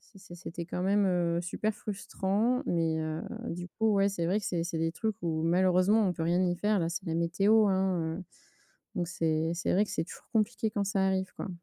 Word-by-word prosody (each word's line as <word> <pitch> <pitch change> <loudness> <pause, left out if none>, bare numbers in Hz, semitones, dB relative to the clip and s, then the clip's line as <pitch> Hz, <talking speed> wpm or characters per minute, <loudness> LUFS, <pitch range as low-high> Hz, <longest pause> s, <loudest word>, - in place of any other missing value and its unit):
c'est 200 - -19
c'est 185 -2 -12
c'était 170 0 -6
quand 180 - -3
même, 200 +1 +3
heu, 170 -2 +1
super 210 +4 -2
frustrant 210 +3 -1
mais, 165 -2 +1
heu, 155 0 -3 0.3
du 175 +1 -5
coup 220 +2 +1
ouais 200 0 +4
c'est 185 -4 -2
vrai 190 +5 +2
que - - -5
c'est 170 -2 -1
c'est 170 -1 -3
des 165 0 0
trucs 220 +2 -2
où 160 -2 -1
malheureusement 185 +5 +3
on 180 - +1
peut 165 - -4
rien 175 +2 +2
y 175 0 0
faire, 205 +2 +1
là 165 - 0
c'est 180 +3 -4
la 160 - -1
météo, 195 +6 +3
hein, 185 -3 0
heu. 185 - -7 0.7
Donc 175 -2 0
c'est 165 -3 0
c'est 175 - -1
vrai 200 +3 +4
que - - -10
c'est - - -1
toujours - - -12
compliqué 220 0 +1
quand 205 -1 -1
ça 195 0 +1
arrive, 190 -1 0
quoi. - - -5
185 Hz, 230 wpm, -30 LUFS, 170-200 Hz, 0.7 s, ouais